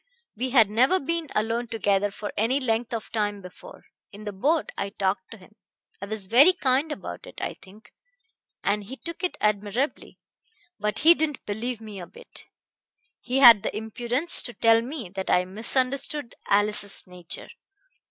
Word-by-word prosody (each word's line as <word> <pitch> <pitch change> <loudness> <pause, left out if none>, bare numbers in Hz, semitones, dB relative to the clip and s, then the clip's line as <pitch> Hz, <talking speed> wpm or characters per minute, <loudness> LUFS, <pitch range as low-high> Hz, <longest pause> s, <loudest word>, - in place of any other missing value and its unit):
We 255 +4 -2
had 235 -5 +5
never 260 - +3
been 335 +2 -3
alone 230 +3 -1
together 205 -3 0
for 205 +1 -7
any 235 +6 +1
length 235 -2 -1
of 230 -2 -5
time 205 -2 -1
before. 195 - -13 0.3
In 205 +1 -11
the 210 - -4
boat 290 +11 0
I 200 - -3
talked 190 -1 -2
to 230 - -11
him. 185 0 -18 0.5
I 200 - -5
was 215 -2 -3
very 270 - +6
kind 285 -2 0
about 400 - -7
it, - - -11
I - - -3
think, 200 +3 -17 0.7
and 205 +1 0
he 260 +6 -9
took 335 +4 -9
it 360 - -1
admirably, 210 +6 -1 0.6
but 210 +1 -2
he 335 - +10
didn't 310 -4 -3
believe 225 +3 -4
me 210 -3 -9
a 175 - -8
bit. 485 0 -14 0.7
He 255 +1 -2
had 235 -6 +10
the 215 - -3
impudence 240 +8 +3
to 240 - -5
tell 225 +1 +4
me 245 - -6
that 190 +1 -5
I 180 - +3
misunderstood 255 +6 -1
Alice's 205 0 +1
nature. 180 -2 -6
225 Hz, 170 wpm, -25 LUFS, 205-265 Hz, 0.7 s, he